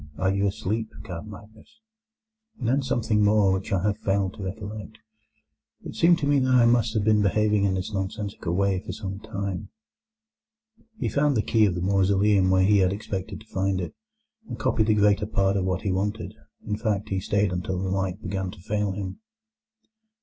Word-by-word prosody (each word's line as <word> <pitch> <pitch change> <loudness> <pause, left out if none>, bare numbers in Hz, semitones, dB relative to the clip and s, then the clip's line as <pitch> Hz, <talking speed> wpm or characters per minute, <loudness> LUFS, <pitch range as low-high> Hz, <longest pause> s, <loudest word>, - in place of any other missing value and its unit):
Are 95 +1 +1
you 100 +1 +1
asleep, 110 +2 -2
Count 90 +2 -7
Magnus?' 110 - -14 0.8
and 125 - -3
then 135 +4 +2
something 115 -5 +1
more 105 -2 +4
which 95 0 -2
I 95 -2 +1
have 105 0 0
failed 95 -1 0
to - - -10
recollect. 105 +2 -6 0.9
It - - -7
seemed 170 +1 +4
to 145 - -1
me 145 0 +3
that 130 0 +1
I 120 -2 +6
must 115 -1 +2
have 105 - +1
been 105 0 +4
behaving 105 +1 +2
in 95 -1 +1
this 95 +3 -4
nonsensical 95 -3 -3
way 100 -1 +1
for - - -7
some 100 -2 -6
time." 100 -4 -5 1.3
He - - -2
found 145 -2 +2
the 105 - +2
key 110 -3 +3
of 90 - -1
the 90 - -3
mausoleum 100 0 +3
where 95 0 +4
he 100 +1 +4
had 95 -1 +3
expected 100 -1 -5
to 110 - -19
find 95 0 0
it, 90 - -4 0.5
and - - -6
copied 120 -5 +1
the 110 - +4
greater 105 0 +3
part 100 -2 +1
of 95 -2 0
what 95 -1 -1
he 100 - 0
wanted; 105 +4 -2 0.3
in 105 -1 -2
fact, 105 -3 -1
he 95 - 0
stayed 100 +1 +1
until 90 +1 -2
the 95 - -2
light 95 +1 -2
began 95 -2 -3
to 100 +1 -11
fail 105 +2 -1
him. 95 - -5
100 Hz, 195 wpm, -25 LUFS, 95-110 Hz, 1.3 s, I